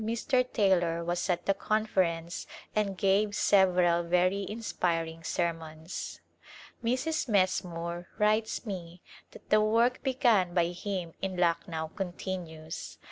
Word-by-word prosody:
Mr. 235 +4 +1
Taylor 175 -5 +2
was 175 +2 -2
at 175 -1 0
the 195 - +3
Conference 185 -5 -1 0.3
and 200 -3 0
gave 205 +2 +2
several 180 -4 +4
very 180 +3 +1
inspiring 165 -7 -2
sermons. 165 -1 -3 0.6
Mrs. 260 +5 0
Messmore 175 -3 0
writes 215 +2 +1
me 180 -4 -7 0.3
that - - -15
the 215 0 +6
work 230 +4 +2
begun 235 -10 +2
by 170 -1 +3
him 180 -1 -4
in 190 -1 -3
Lucknow 170 -2 0
continues. 175 -4 -5
185 Hz, 115 wpm, -30 LUFS, 170-210 Hz, 0.6 s, the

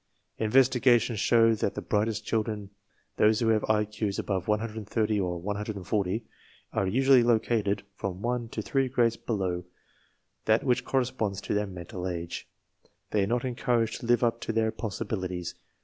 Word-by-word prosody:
Inves 120 +4 +5
tigations 120 -3 +3
show 115 +1 +4
that 105 -2 -1
the - - -3
brightest 105 +1 0
childre 110 0 0
n, 105 -2 -8 0.5
those 110 0 +4
who 115 - +1
^have 110 -1 +4
IQ*s 105 -1 0
above 95 -3 -2
130 110 0 0
or 90 -2 -1
140 100 0 -2
a 110 0 -12
are 95 - +1
usually 130 +5 +5
locatedjfrom 105 -5 0
one 120 +4 -2
to 110 - -4
three 135 +2 +1
grades 120 -2 +2
below 95 -7 -2 0.8
that 110 +3 +3
which 125 -4 +1
corresponds 125 -7 0
to. - - -3
"their 105 0 0
mental 90 0 -6
age. 85 -1 -5 0.6
They 105 -2 +2
are - - 0
not 120 +3 0
encouraged 120 -2 0
to 115 - -7
live 120 0 +3
up 115 0 +1
to - - -2
their 110 0 +1
possibilities. 95 -5 -4
110 Hz, 160 wpm, -28 LUFS, 100-115 Hz, 0.8 s, Inves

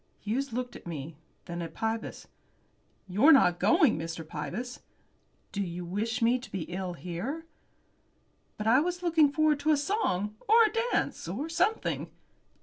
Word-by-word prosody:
Hughes 260 +6 -2
looked 245 +1 -4
at - - -11
me, 155 -1 -6 0.3
then 175 -1 -5
at 165 - -7
Pybus. 225 0 -3 0.8
"You're 210 - +5
not 180 - +5
going, 310 - +4
Mr. 165 0 -5
Pybus?" 190 +13 -5 0.7
"Do 200 - -2
you 175 -1 -4
wish 225 +7 -2
me 240 +2 +4
to 250 - -12
be 190 -4 -3
ill 180 +1 -4
here?" 185 - -5 1.1
"But 210 - -4
I 230 +4 +6
was 355 +3 -2
looking 320 -4 +4
forward 305 -1 +2
to 310 - -1
a 305 - +5
song, 215 - -1
or 450 - +7
a 430 - +2 0.2
dance, - - -1
or 305 +3 -3
something." 370 +6 0
230 Hz, 155 wpm, -29 LUFS, -, 1.1 s, or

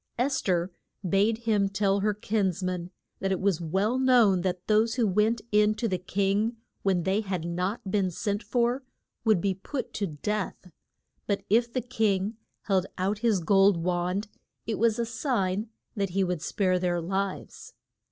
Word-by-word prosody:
Es 265 +2 +1
ther 180 -1 0 0.4
bade 205 +5 +3
him 210 -3 +2
tell 195 0 +1
her 210 +1 +1
kins 200 -3 -1
man 180 -1 -2 0.3
that 195 - -1
it 190 - 0
was 190 -4 +1
well 195 +9 0
known 240 -8 +5
that 180 0 -2
those 220 +1 +3
who 240 -3 +2
went 215 +3 +2
in 210 0 +4
to 230 - -1
the 185 -4 -1
king 200 +5 0 0.2
when 185 -3 +1
they 195 +4 +1
had 185 -5 -3
not 185 +4 -2
been 195 -2 +2
sent 205 +4 -2
for, 245 +2 0 0.4
would 220 -5 +4
be 195 +2 +1
put 250 +9 -5
to 200 - -1
death. 185 +3 -4 0.6
But 200 -1 -1
if 235 +2 +3
the 255 - -1
king 215 -3 0 0.3
held 190 -2 +1
out 195 +3 0
his 215 -5 +2
gold 195 +2 +4
wand 180 +4 -1 0.4
it 220 -3 -2
was 225 -1 +3
a 235 - 0
sign 220 -4 -1 0.3
that 200 -2 -1
he 195 +2 +1
would 180 -3 -2
spare 185 +1 +1
their 175 -1 0
lives. 190 +3 -4
200 Hz, 170 wpm, -27 LUFS, 185-220 Hz, 0.6 s, known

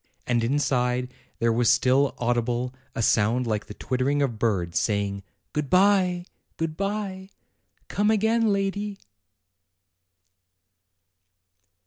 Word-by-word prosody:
And 120 -2 +1
inside 125 -1 0 0.2
there 115 0 +2
was 120 0 +2
still 130 +2 +3
audible 120 +1 -1 0.2
a 115 - -1
sound 115 +4 +2
like 105 -3 -2
the 105 - -9
twittering 135 +3 0
of 120 -6 -2
birds, 95 -7 0
saying: 100 -2 -1 0.3
"Good 150 -2 -2
bye! 185 -2 +3 0.3
good 165 -1 -2
bye! 195 0 -3 0.6
Come 205 +1 +1
again, 220 +1 +2
lady!" 200 +1 -1
130 Hz, 105 wpm, -25 LUFS, 115-190 Hz, 0.6 s, still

